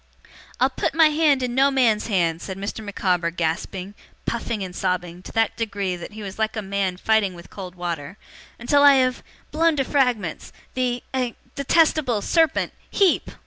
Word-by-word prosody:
'I'll - - +3
put - - -2
my 320 -1 +6
hand 300 -3 +3
in 245 -1 -2
no 270 +2 +4
man's 240 -6 +2
hand,' 170 -6 +1
said 190 -1 -6
Mr. 200 +3 -5
Micawber, 180 -4 0
gasping, 180 +3 -3 0.3
puffing, 230 -3 -2
and 180 -1 -7
sobbing, 180 -2 -2
to - - -10
that 225 0 +1
degree 200 -5 -2
that 175 +4 -9
he 215 0 -8
was 195 +1 -8
like 220 0 0
a 215 - -3
man 195 -2 -1
fighting 205 -2 +1
with 170 0 -13
cold 185 -2 -8
water, 170 -1 -5 0.4
'until 285 +5 +2
I 285 -1 +8
have 255 -1 +2 0.3
blown 325 +1 +3
to 275 - +1
fragments 250 - 0 0.2
the 250 -1 -1
a 250 -3 -1 0.2
detestable 280 -6 +2
serpent 325 -3 +2 0.2
HEEP! 390 -4 +2
215 Hz, 175 wpm, -23 LUFS, 185-260 Hz, 0.4 s, I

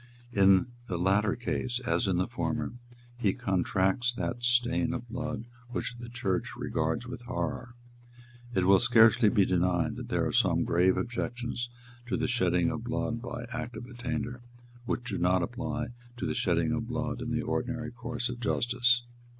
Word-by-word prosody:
In 95 -1 +6 0.2
the 90 - -2
latter 100 +4 +2
case, 120 0 -2
as 85 -5 +1
in 95 -2 +2
the 90 - +2
former, 120 0 -2 0.5
he 100 -5 +2
contracts 95 +5 +1
that 120 0 -3
stain 120 +1 +2
of 120 -1 -6
blood 125 -1 -4 0.2
which 120 0 -3
the 120 -1 -7
Church 100 -7 -1
regards 80 +8 -1
with 125 0 -7
horror; 120 0 -4 0.7
and 120 - -6
it 95 - +3
will 95 0 +7
scarcely 115 -1 +6
be 100 -1 +4
denied 90 -1 +1
that - - -7
there - - +1
are - - 0
some - - +3
grave 90 +2 +3
objections 120 0 -3 0.4
to - - 0
the - - 0
shedding 90 -8 +2
of 115 - -4
blood 115 -1 -2
by 120 -1 -5
Act 120 0 -4
of 120 - -7
Attainder 120 -1 -4 0.4
which 120 - -1
do - - -2
not 90 +1 +3
apply 120 +2 -3 0.3
to - - -3
the - - 0
shedding 90 -6 +1
of 115 -1 -1
blood 125 0 -2
in 125 - -3
the 120 0 0
ordinary 120 -1 -2
course 120 0 -3
of 120 -1 -5
justice. 120 +1 +2
120 Hz, 175 wpm, -29 LUFS, 95-120 Hz, 0.7 s, will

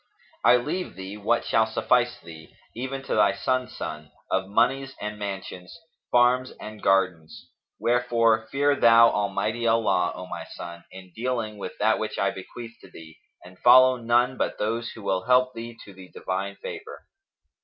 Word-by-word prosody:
I 120 - +7
leave 155 +9 -3
thee 95 +1 -7
what 105 +3 0
shall 110 0 +2
suffice 120 +2 +1
thee, 80 -1 -13 0.2
even 130 +3 -5
to - - -3
thy 100 -2 +3
son's 130 +5 -2
son, 75 -1 -6 0.2
of 95 0 0
monies 135 +5 +1
and 105 0 -5
mansions, 95 - -7 0.3
farms 125 +1 +3
and 110 0 -9
gardens; 90 -5 0 0.3
wherefore, 115 -2 +2
fear 145 +3 +1
thou 115 -2 +6
Almighty 105 +3 -1
Allah, 110 -6 +2
O 90 - -7
my - - -7
son, 85 0 -9
in 95 -1 -12
dealing 115 -3 -3
with 95 - -6
that 110 +1 +2
which 110 - -4
I 100 0 +1
bequeath 115 +5 -10
to - - -15
thee 80 -1 -14 0.3
and 90 0 -15
follow 130 +1 +7
none 120 +2 +1
but - - -2
those 115 +2 -2
who 110 - -11
will 95 -2 -1
help 125 0 +4
thee 115 0 -8
to 100 - -13
the 95 -1 -13
Divine 95 +2 -4
favour." 425 - -9
110 Hz, 165 wpm, -25 LUFS, 95-125 Hz, 0.3 s, I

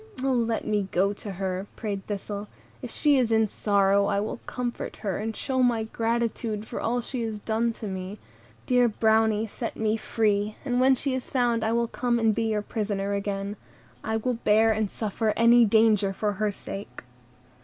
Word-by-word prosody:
"O 270 - +2
let 230 -2 0
me 210 -2 0
go 195 +3 +2
to 205 0 -7
her," 190 +1 -3
prayed 200 -3 -4
Thistle; 205 0 -4 0.3
"if 250 - -6
she 290 +3 +3
is 235 -3 +1
in 220 -1 +4
sorrow, 200 -1 +2
I 200 - +1
will 215 +3 -3
comfort 245 -1 -4
her, 195 -3 -1
and 220 +1 -3
show 260 -2 -1
my 240 -3 +2
gratitude 225 -1 -2
for - - -5
all 245 +1 0
she 245 +1 -4
has 220 -2 -3
done 225 +2 0
for 225 -1 -8
me: 190 +1 -5 0.5
dear 250 -1 +4
Brownie, 220 0 +2
set 225 +2 -5
me 220 0 +1
free, 210 -2 0
and 245 -2 0
when 265 +1 +5
she 270 +1 -1
is 260 -1 -4
found 240 -3 +1
I 220 - +1
will 235 0 +1
come 240 0 0
and 225 -2 +3
be 225 - -1
your 210 -1 0
prisoner 205 -2 -2
again. 200 0 -3 0.5
I 220 - -1
will 235 +1 -2
bear 220 +2 +4
and 215 -1 0
suffer 215 +1 -1
any 235 +1 +6
danger 215 -2 +3
for 210 +1 -1
her 210 +1 0
sake." 195 0 -7
220 Hz, 190 wpm, -26 LUFS, 205-235 Hz, 0.5 s, any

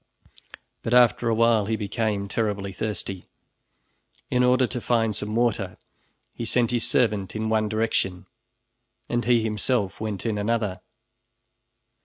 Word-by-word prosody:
But 115 - 0
after 120 -1 +5
a 115 - +2
while 115 -2 +3
he 110 - +1
became 105 -1 -2
terribly 100 -2 -2
thirsty. 95 -2 -4 1.1
In 125 0 +3
order 125 +1 +4
to 125 0 -4
find 115 -3 +1
some 105 +1 -4
water 110 -6 0 0.6
he - - -6
sent 115 +1 +1
his 120 -2 0
servant 105 -6 +1
in 110 0 -1
one 110 -1 +1
direction 110 -4 -1 0.8
and 120 0 0
he 120 -2 +3
himself 105 -1 -1
went 110 -2 -4
in 110 -2 -1
another. 105 -3 -1
110 Hz, 135 wpm, -25 LUFS, 105-120 Hz, 1.1 s, after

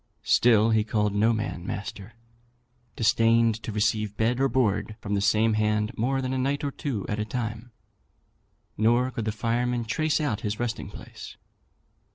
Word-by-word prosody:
Still, 115 -2 +4
he 110 -1 +3
called 105 -1 0
no 110 +3 +3
man 110 -6 -3
master, 100 +2 -6 0.8
disdained 115 0 +3
to 110 - -5
receive 105 0 0
bed 120 +3 +1
or 135 0 +2
board 110 -4 0
from 105 -2 -4
the 100 - +1
same 110 +2 +3
hand 105 0 0
more 135 +4 0
than 130 0 -2
a 130 - -1
night 140 +3 -1
or 140 - -1
two 130 - -4
at 105 - -2
a - - 0
time, 115 0 -5 1.0
nor 120 +4 +2
could 115 -3 -4
the 110 - 0
firemen 120 +2 -1
trace 155 +7 0
out 125 -9 -1
his 105 0 -3
resting 120 -1 -3
place." - - -11
115 Hz, 170 wpm, -26 LUFS, 105-125 Hz, 1.0 s, Still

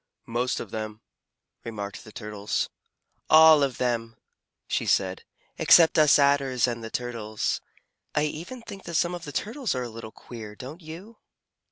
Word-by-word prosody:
"Most 120 +2 -1
of - - -7
them," 110 0 -5 0.6
remarked 105 -3 -6
the 110 - -13
Turtles. 105 -2 -3 0.6
"All 155 -1 +8
of 135 -2 0
them," 115 -2 -1 0.5
she - - -1
said, 95 -1 +1 0.4
"except 165 -2 +6
us 150 -2 +7
Adders 140 -3 +3
and 120 -1 -4
the 115 - -5
Turtles. 115 -3 -3 0.5
I 150 - +3
even 170 +12 -5
think 200 -4 -10
that 170 - -5
some 175 +2 +2
of 175 -1 -6
the 145 - -6
Turtles 230 - -2
are 125 - -2
a 120 - -5
little 115 -1 -9
queer, 110 -3 -10
don't 140 - -9
you?" 175 +8 -10
125 Hz, 160 wpm, -26 LUFS, 115-160 Hz, 0.6 s, All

